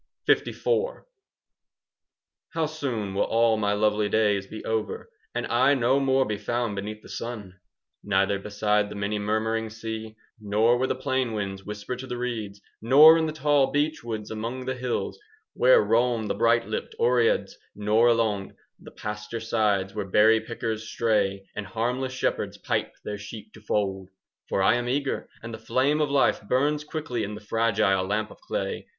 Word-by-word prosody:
LIV - - +1 1.9
How 165 -1 +1
soon 130 -10 -3
will 100 - 0
all 115 0 +3
my 105 -1 0
lovely 105 0 +1
days 105 -3 +2
be 110 - -8
over, 110 -1 -3 0.2
And - - -1
I 130 +4 +3
no 130 +1 +3
more 135 -1 +2
be 105 -1 -3
found 120 0 -2
beneath 105 +2 -6
the - - -13
sun,— 105 -6 -7 0.4
Neither 100 0 +1
beside 105 0 0
the - - -8
many 100 +1 -2
murmuring 110 +2 -1
sea, 110 0 -6 0.2
Nor 110 +3 +2
where 130 - +1
the - - -1
plain 130 -2 -1
winds 95 -2 -4
whisper 105 +4 -5
to 130 +1 -8
the 125 -1 -4
reeds, 110 -5 -4 0.2
Nor 145 +8 +8
in 160 - +1
the - - -2
tall 145 -3 +2
beech 150 0 0
woods 110 -2 -5
among 115 +4 -4
the 130 - -1
hills 125 -1 -3
5 - - -29 0.3
Where - - +5
roam 120 -1 +2
the - - -1
bright 115 +1 +3
lipped 110 - -4
Oreads, 120 -1 +2 0.2
nor 105 +3 +3
along 110 -4 +1 0.2
The - - -12
pasture 105 +2 -6
sides 105 -4 0
where 105 0 -2
berry 110 +3 +5
pickers 110 -1 -4
stray 100 -4 0
And 105 -1 -5
harmless 125 +4 -2
shepherds 130 - -2
pipe - - -2
their 105 -1 -4
sheep 105 +1 -10
to 110 - -14
fold! 95 -3 -2 0.4
For 95 - +1
I 120 - +4
am 120 0 -2
eager, 135 +1 -2
and 115 0 -7
the - - -7
flame 135 +6 +1
of 150 - +1
life 140 -1 +2
Burns 145 +7 +1
quickly 150 -7 -3
in 105 +1 -4
the - - -8
fragile 105 -3 +1
lamp 105 +3 -2
of - - -14
clay. - - -4
110 Hz, 175 wpm, -26 LUFS, 105-125 Hz, 1.9 s, Nor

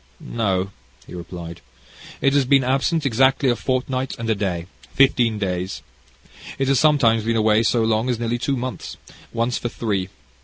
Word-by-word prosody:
"No," 100 -4 -1 0.3
he - - -12
replied, 85 -1 -8 0.6
"it 135 - +3
has 140 -1 +4
been 135 +1 +4
absent 135 +5 0
exactly 130 +2 +3
a 120 - +2
fortnight 130 +1 -2
and 115 - -5
a - - +4
day 95 -5 -2 0.3
fifteen 120 -5 +3
days. 95 -2 -3 0.7
It 135 0 0
has 135 - +3
sometimes 120 -8 +3
been 115 +1 0
away 110 0 +3
so 115 0 +2
long 110 +2 +1
as 120 - 0
nearly 120 +1 -2
two 135 +2 -1
months, 130 +1 -5 0.3
once 115 +1 -1
for 120 - -3
three. 100 -6 -2
115 Hz, 165 wpm, -22 LUFS, 105-130 Hz, 0.7 s, has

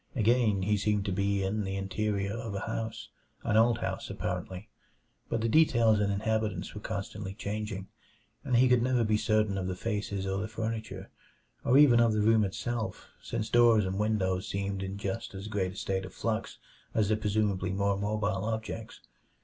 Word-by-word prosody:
Again 110 -4 +3
he 105 +2 +2
seemed 105 0 0
to 100 - -1
be 100 +1 0
in 105 +3 -1
the 95 0 -3
interior 100 +1 -1
of 115 -3 -5
a 100 - -3
house 110 0 -4 0.3
an - - 0
old 115 +1 +5
house, - - -3
apparently 95 +3 -4 0.6
but 115 - -1
the 115 - +1
details 115 -5 +4
and 100 -1 +1
inhabitants 105 -2 -1
were 105 - -7
constantly 100 -2 -5
changing, 100 -2 -4 0.6
and 125 - 0
he 125 +2 +6
could 125 -1 +4
never 125 -1 +2
be 110 -1 +2
certain 105 -2 +1
of 90 - -3
the 95 - -2
faces 100 -1 -3
or 95 0 -1
the 105 - -2
furniture, 110 -3 -5 0.5
or 130 - +4
even 135 -5 +7
of 115 -2 +4
the 105 - +1
room 110 0 +4
itself, 110 +3 -3
since 110 - -3
doors 115 -3 +5
and 95 +1 -2
windows 95 -4 0
seemed 100 0 -2
in 95 +1 -4
just 100 -1 -4
as 95 +2 -6
great 95 -3 -1
a - - -14
state 95 0 -2
of 95 - -11
flux - - -2 0.4
as 105 -2 +2
the 110 - +3
presumably 105 -3 0
more 100 +1 +1
mobile 100 0 -1
objects. 110 0 -4
105 Hz, 185 wpm, -30 LUFS, 100-110 Hz, 0.6 s, even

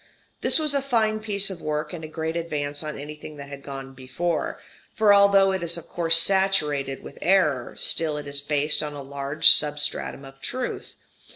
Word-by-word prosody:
This - - +5
was 305 -2 +1
a 280 - +1
fine 225 -5 0
piece 200 -2 -1
of 180 - -8
work, 150 +1 -3
and 165 -2 -7
a - - -5
great 160 +1 -4
advance 145 -4 -3
on 150 -1 -5
anything 150 +1 -9
that 140 -1 -9
had 140 -1 -9
gone 135 -1 -8
before; 155 +6 -3 0.4
for 215 -2 +5
although 200 -1 +5
it 190 -1 -2
is 170 0 +1
of 170 - -7
course 165 -1 +2
saturated 155 -8 +1
with - - -11
error, 155 -10 +1
still 155 -3 +2
it 150 - -6
is 140 0 -5
based 150 +1 +1
on 150 -1 -5
a 145 -1 -7
large 140 +3 +3
substratum 145 -2 +1
of 135 0 -15
truth. 255 0 -5
155 Hz, 190 wpm, -24 LUFS, 145-190 Hz, 0.4 s, This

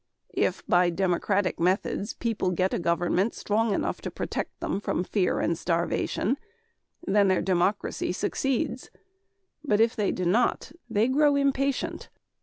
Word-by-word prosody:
If - - 0
by 175 0 +4
democratic 190 +2 0
methods 190 +4 0
people 225 -5 -1
get 185 +1 0
a - - 0
government 175 +5 +1
strong 220 +1 0
enough - - -1
to - - -4
protect - - -4
them - - -2
from 180 - -1
fear 185 -1 0
and 170 - +1
starvation, 175 - -1 0.7
their 195 - +3
democracy 185 +2 0
succeeds, 255 -2 -2 0.7
but 210 -8 +1
if 225 +1 +3
they 210 -2 +1
do 185 - -3
not, 220 +8 +1 0.2
they 220 +1 +2
grow 290 +2 +3
impatient. 275 -1 0
200 Hz, 135 wpm, -27 LUFS, 180-235 Hz, 0.7 s, by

